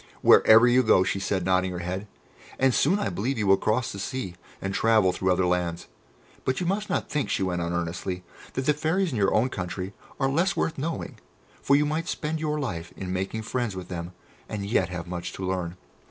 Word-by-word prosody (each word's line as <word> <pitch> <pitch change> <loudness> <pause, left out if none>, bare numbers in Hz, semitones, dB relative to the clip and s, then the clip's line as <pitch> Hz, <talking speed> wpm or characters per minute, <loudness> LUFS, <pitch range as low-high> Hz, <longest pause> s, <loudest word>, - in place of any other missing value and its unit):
"Wherever 115 +2 +7
you 125 +1 +5
go!" 110 -6 +5
she 95 +1 -1
said, 95 -1 -1
nodding 95 0 +2
her - - -4
head, 90 +4 -4 0.5
"and 130 -1 +3
soon 170 - +3
I 205 - -1
believe 115 +9 -2
you 105 - 0
will 95 0 +6
cross 115 +5 0
the 100 - -7
sea 115 -3 -4 0.3
and 95 0 -3
travel 110 -4 +4
through 95 +1 0
other 90 0 +2
lands. 90 -1 -1 0.6
But 130 0 0
you 180 - -2
must 200 +4 -1
not 180 - -1
think," 150 -2 -1
she - - 0
went 90 -2 -1
on 85 0 -2
earnestly, 90 +2 -3 0.3
"that 130 - -2
the 150 - +4
Fairies 165 +5 0
in 125 - -2
your 100 -2 +3
own 115 +4 +3
country 95 -2 -4 0.3
are 135 - +2
less 170 +8 +1
worth 160 -3 -1
knowing, 160 +4 -4 0.4
for 140 - +4
you 145 +1 +4
might 155 +2 -1
spend 155 0 -2
your 150 -1 -1
life 85 - -4
in 95 -1 -4
making 95 +4 -2
friends 120 -2 -2
with 95 -1 -7
them, 85 0 -5 0.4
and 100 -2 -4
yet 100 -4 +1
have 85 -1 -5
much 90 -1 -5
to 95 - -5
learn." 90 -1 -2
100 Hz, 220 wpm, -26 LUFS, 90-135 Hz, 0.6 s, Wherever